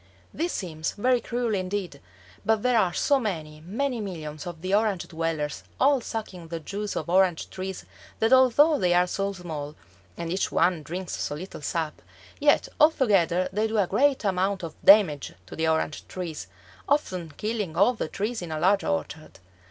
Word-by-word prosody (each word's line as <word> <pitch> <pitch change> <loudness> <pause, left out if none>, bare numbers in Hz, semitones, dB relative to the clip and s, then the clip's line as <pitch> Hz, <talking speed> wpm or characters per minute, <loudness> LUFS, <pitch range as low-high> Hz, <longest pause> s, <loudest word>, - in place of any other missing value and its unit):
This 340 +4 -1
seems 160 -4 -3
very 245 +3 +2
cruel 240 -2 -2
indeed, 185 -5 -3 0.4
but 220 0 +1
there 250 -2 +4
are 185 -4 +2
so 280 +9 +2
many, 155 -9 -4
many 235 +6 -2
millions 155 -6 -6
of 170 -1 -8
the 185 +1 -1
Orange 205 -3 +1
dwellers 160 -2 -2 0.2
all 275 -1 +4
sucking 195 -8 -6
the 165 0 -5
juice 200 +6 -5
of 155 - -3
orange 180 -1 +2
trees 190 0 -6 0.3
that 225 +3 +3
although 260 +4 +5
they 180 -2 +3
are 180 0 +5
so 195 +2 -2
small, 155 -5 -6 0.4
and 170 -1 -4
each 190 - -1
one 175 -1 +2
drinks 180 +4 -5
so 145 - -3
little 180 +1 -8
sap, 160 +1 -3 0.4
yet - - +4
altogether 200 - +4
they 215 +2 +1
do 220 0 -2
a 200 - +4
great 265 +9 +2
amount 190 0 0
of 165 -2 -5
damage 195 -9 +5
to - - -10
the 160 0 0
orange 160 -1 -1
trees, 165 - -6 0.4
often 185 - 0
killing 210 -6 -3
all 200 +7 +5
the 215 - -3
trees 215 +7 -3
in 170 -2 -6
a 155 - -2
large 195 +4 +3
orchard. 175 -5 -3
185 Hz, 175 wpm, -26 LUFS, 165-220 Hz, 0.4 s, although